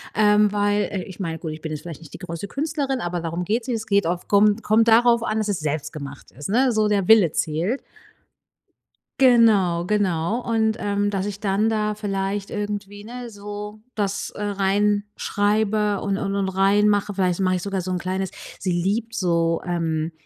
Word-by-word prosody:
ähm, 210 0 +4
weil 205 0 +1
äh, 190 -3 -3
ich 190 +1 -11
meine, 165 -4 -3
gut, 160 -1 -5
ich 155 0 -8
bin 160 -1 -5
jetzt 150 - -4
vielleicht 165 -3 -8
nicht 160 - -14
die - - -6
größte 175 +1 -6
Künstlerin, 280 0 -2
aber 175 -3 -2
darum 170 +1 -3
geht's 225 +6 -1
nicht. 240 -3 0
Es 220 - -6
geht 200 -4 +2
auf 175 +1 -3
kommt 210 +2 +4
kommt 225 +2 +3
darauf 235 +1 +5
an, 220 -1 -1
dass 215 -1 0
es 205 -4 -1
selbst 155 -1 -3
gemacht 140 -2 -9
ist, 145 +5 -7
ne? 250 +4 +3
So 215 -1 +2
der 200 -3 +1
Wille 215 -8 +6
zählt. 165 - -1 1.4
Genau, 215 -9 +4
genau. 200 +1 0
Und, 220 -1 +1
ähm, 205 -1 0
dass 195 -1 -2
ich 205 -1 -5
dann 205 +2 +1
da 210 -1 0
vielleicht 195 -1 -3
irgendwie, 205 -1 -5
ne, 245 +1 -7
so 205 0 -8 0.2
das, 200 -1 -2
äh, 210 - -6
reinschreibe 205 +1 0
und 200 -1 -1
und 195 0 -2
und 195 -1 0
reinmache. 205 +2 +2
Vielleicht 185 -2 0
mache 185 -1 +2
ich 180 - -2
sogar 195 +1 -2
so 185 0 -4
'n 180 - 0
kleines 185 +1 -3 0.3
sie 185 - -1
liebt 210 +6 -1
so, 170 -5 +1
ähm, 165 -2 -1
205 Hz, 195 wpm, -23 LUFS, 180-215 Hz, 1.4 s, Wille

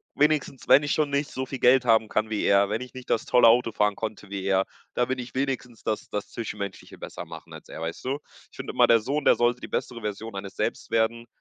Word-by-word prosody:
Wenigstens, 150 -2 +1
wenn 145 - +7
ich 145 - 0
schon 155 -2 +1
nicht 140 +1 0
so 130 - -3
viel 130 0 -6
Geld 125 0 +5
haben 110 -2 +4
kann 110 0 0
wie 105 - -1
er, 100 0 +4
wenn 110 +3 -1
ich 125 - -9
nicht 130 -1 -10
das 110 - +1
tolle 125 -2 +5
Auto 115 0 +4
fahren 105 -1 +1
konnte 110 -2 -6
wie 100 -1 -4
er, 95 0 +2 0.3
da 125 - +2
bin 130 +1 -3
ich 125 0 -8
wenigstens 130 -3 -3
das 110 -1 -3
das 105 - -4
Zwischenmenschliche 105 -3 -6
besser - - -7
machen - - -11
als - - -12
er, - - -8
weißt 80 +1 -5
du? 135 +2 -1 0.3
Ich - - -18
finde - - -6
immer, - - +5
der 115 - +6
Sohn, 140 +6 -2
der - - +6
sollte 120 +1 +1
die - - -6
bessere 120 -1 -3
Version 105 +1 -5
eines 95 0 -7
Selbst - - -2
werden. 115 +1 +1
115 Hz, 250 wpm, -26 LUFS, 105-130 Hz, 0.3 s, wenn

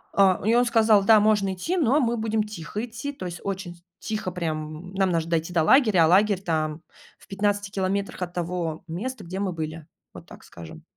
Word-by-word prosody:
а, 195 -2 +4
и 225 - +3
он 245 +1 +4
сказал: 220 -3 +4
"Да, 215 +1 +6
можно 205 -2 +2
идти, 330 - -3
но 290 -1 +3
мы 235 -3 0
будем 220 -1 0
тихо 210 +2 -6
идти". 235 +5 -6
То 190 -10 -8
есть 175 -1 -6
очень 185 -3 -5 0.2
тихо 210 -4 -4
прям, 160 0 -5
нам 190 -1 +1
наж 165 -2 0
дойти 165 +1 -2
до 165 -2 +3
лагеря, 215 - +5
а - - +3
лагерь 195 +2 +3
там 155 -2 -2 0.4
в - - -21
15 205 0 -1
километрах 195 -1 -2
от 175 0 -4
того 175 -2 -3
места, 240 +11 -5
где 185 +3 -6
мы 195 -3 -2
были, 160 -1 -6 0.3
вот - - -12
так - - -14
скажем. 80 -2 -12
190 Hz, 200 wpm, -25 LUFS, 170-215 Hz, 0.4 s, Да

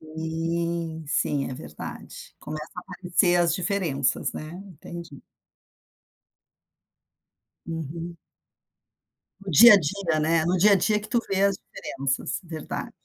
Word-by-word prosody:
Sim, 165 +1 -3
sim, 145 -2 0
é - - -4
verdade. 75 -9 -9
Começa 155 +1 -7
a - - -3
aparecer 180 -1 +1
as 170 -1 +3
diferenças, 175 -7 0
né. 155 +1 -7
Entendi. 170 -3 -10 2.5
Uhum. 165 +1 -5 1.2
No 195 - -6
dia 215 +7 +10
a - - +9
dia, 170 -1 0
né, 160 +1 +2
no 180 +2 +2
dia 205 +4 +6
a - - +8
dia 210 +3 +2
que 210 - -10
tu 235 - +2
vê 195 0 +1
as 200 -1 +3
diferenças. 135 +5 -4
Verdade. 160 -3 -6
170 Hz, 125 wpm, -25 LUFS, 155-185 Hz, 2.5 s, dia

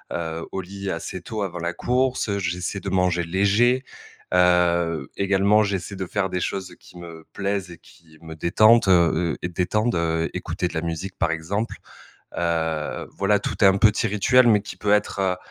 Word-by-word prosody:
heu, 80 -1 -4
au 95 - -3
lit 100 +1 -6
assez 85 +2 -5
tôt 110 +3 -5
avant 90 -3 -4
la 85 0 -3
course, 125 -2 0
heu, 100 - 0
j'essaie 90 +2 -3
de 100 - -5
manger 90 -2 +1
léger, 100 +9 +2 0.5
heu, 85 -4 +2
également 100 +2 +3
j'essaie 100 0 -3
de 95 - -4
faire 95 +1 -2
des 90 - -2
choses 95 +1 -4
qui 90 - -15
me 85 -2 -11
plaisent 100 -2 -2
et 85 - -12
qui 80 -2 -21
me 80 -1 -9
détendent, 110 +6 +4
heu 85 -2 +3
heu, - - -2
détendent, 100 +6 0
heu, 80 0 0
écouter 90 - -3
de - - -9
la 80 - -1
musique 85 +3 -5
par 85 -2 +1
exemple. 95 +8 -3 0.6
Heu, 80 -2 -2
voilà, - - +1
tout - - -4
un 95 0 +6
petit 110 +1 +3
rituel 120 +5 +4
mais 105 -2 +4
qui - - -8
peut 105 0 0
être, 105 -1 +1
heu 95 -1 +1
90 Hz, 185 wpm, -23 LUFS, 85-100 Hz, 0.6 s, un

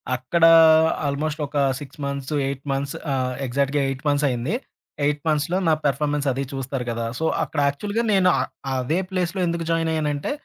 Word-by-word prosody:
అక్కడా 165 +7 +3 0.6
ఆల్మోస్టొకా 145 0 -1 0.2
6 145 +1 -11
months, 140 0 -4 0.2
8 135 -1 -4
months 140 +1 -2 0.2
ఆహ్, 130 -1 -1
ఎగ్జాక్ట్‌గా 140 +3 0
8 135 0 -5
మంత్సయింది. 140 - +1 0.5
8 145 0 0
మంత్స్‌లో 155 +3 +1
నా 160 - +5
పెర్ఫార్మన్సది 140 -1 0
చూస్తారు 135 -1 -4
గదా! 115 0 -2
సో, 160 - -1 0.2
అక్కడ 150 0 -4
యాక్చువల్‌గా 205 +11 -1
నేను 190 -2 +4
అ - - +2 0.3
అదే 130 +7 0
ప్లేస్‌లో 185 -1 -2
ఎందుకు 170 0 -2
జాయినయ్యానంటే, 160 -3 -1
145 Hz, 145 wpm, -23 LUFS, 135-160 Hz, 0.6 s, నా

